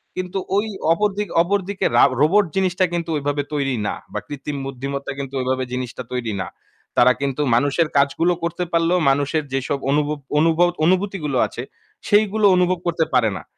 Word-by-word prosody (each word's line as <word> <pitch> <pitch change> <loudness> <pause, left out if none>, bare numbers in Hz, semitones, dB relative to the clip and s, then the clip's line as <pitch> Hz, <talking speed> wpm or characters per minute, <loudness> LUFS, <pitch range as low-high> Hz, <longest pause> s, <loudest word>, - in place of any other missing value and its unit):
কিন্তু 185 +1 -4 0.2
ওই 205 +2 +2 0.3
অপরদিক 205 +2 -1 0.2
অপরদিকে 200 +1 -1
রা - - +7 0.2
রোবট 195 +7 +4
জিনিসটা 185 -1 +2
কিন্তু 170 -1 -2
ওইভাবে 145 0 -1
তৈরি 135 -3 0
না - - -1 0.2
বা - - -1
কৃত্রিম 145 0 -5
বুদ্ধিমত্তা 140 +1 -5
কিন্তু 135 -1 -6
ওইভাবে 130 0 -1
জিনিসটা 125 0 -4
তৈরি 120 -4 -2
না। 95 - -4 0.5
তারা 125 +1 +6
কিন্তু 140 +1 -1
মানুষের 145 +6 +2
কাজগুলো 140 +5 +2
করতে 170 +1 -2
পারলেও 170 +2 +2
মানুষের 145 +3 +1
যেসব 135 +1 -1
অনুভব 150 +1 +1 0.2
অনুভব 165 +2 +4 0.2
অনুভূতিগুলো 185 -7 0
আছে 120 - -7 0.4
সেইগুলো 210 0 +3
অনুভব 180 0 +2
করতে 165 -1 +1
পারে 115 -3 +4
না। - - -9
155 Hz, 160 wpm, -21 LUFS, 140-185 Hz, 0.5 s, রা